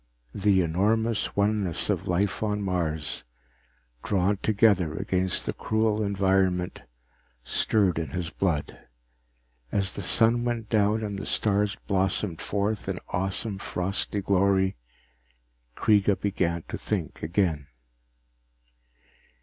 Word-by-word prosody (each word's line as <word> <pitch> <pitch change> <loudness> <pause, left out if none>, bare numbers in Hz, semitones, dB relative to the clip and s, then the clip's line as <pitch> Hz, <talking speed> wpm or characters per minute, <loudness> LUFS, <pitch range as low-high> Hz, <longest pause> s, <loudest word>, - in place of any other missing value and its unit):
The 100 -2 +3
enormous 105 +7 0
oneness 100 -4 +1
of - - -2
life 95 +3 0
on 105 -1 -1
Mars, 80 -5 -2 0.8
drawn 100 0 +1
together 100 -6 +2
against 95 -1 -1
the - - -2
cruel 110 -1 0
environment, 95 -3 +1 0.6
stirred 95 - +1
in 80 -3 -3
his 85 +3 -4
blood. 85 -7 -1 0.9
As 100 -1 0
the - - -5
sun 115 +1 +3
went 120 -3 -2
down 110 0 +2
and 100 -2 -3
the - - -5
stars 105 -1 +1
blossomed 95 -2 0
forth 105 +1 -2
in - - -2
awesome 95 +2 -2
frosty 100 +2 -2
glory, 95 0 +2 1.0
Kreega 105 -2 +3
began 85 -5 -1
to - - -4
think - - -3
again. 80 -4 0
100 Hz, 110 wpm, -27 LUFS, 90-105 Hz, 1.0 s, The